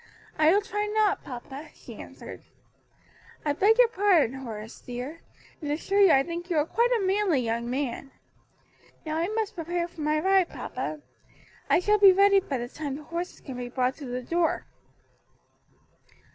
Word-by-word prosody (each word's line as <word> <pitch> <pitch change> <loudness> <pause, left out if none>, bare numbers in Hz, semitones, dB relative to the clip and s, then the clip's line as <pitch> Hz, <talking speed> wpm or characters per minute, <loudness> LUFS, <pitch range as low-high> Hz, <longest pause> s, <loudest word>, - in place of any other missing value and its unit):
"I 310 +1 +6
will 405 +3 +3
try 415 +1 -2
not, 425 -1 +1
papa," 270 +4 -8
she - - -12
answered. - - -10 1.0
"I 295 - +2
beg 415 +9 +4
your - - +7
pardon, 380 - +3
Horace 225 -3 -8
dear, 250 +6 -7 0.4
and 295 -2 -3
assure 390 +7 +1
you 390 - +7
I 270 -4 +5
think 340 +3 -6
you 335 - 0
are 300 - +3
quite 470 +8 +1
a 400 - -1
manly 380 -6 +2
young 235 0 -2
man. 270 0 -3 1.0
Now 310 0 -2
I 335 +2 0
must 435 0 -2
prepare 345 0 -2
for 340 -2 -11
my 305 +1 +1
ride, 380 +1 +3
papa. 305 - -5 0.7
I - - +5
shall 420 +3 +2
be 395 -1 +9
ready 395 +1 +5
by 280 -8 -3
the 240 0 -4
time 285 +1 -5
the 300 - -9
horses 340 +3 -5
can 265 -3 -8
be 245 -1 -5
brought 255 +1 0
to 290 - -8
the 250 0 -4
door." 335 +5 0
320 Hz, 175 wpm, -27 LUFS, 270-390 Hz, 1.0 s, be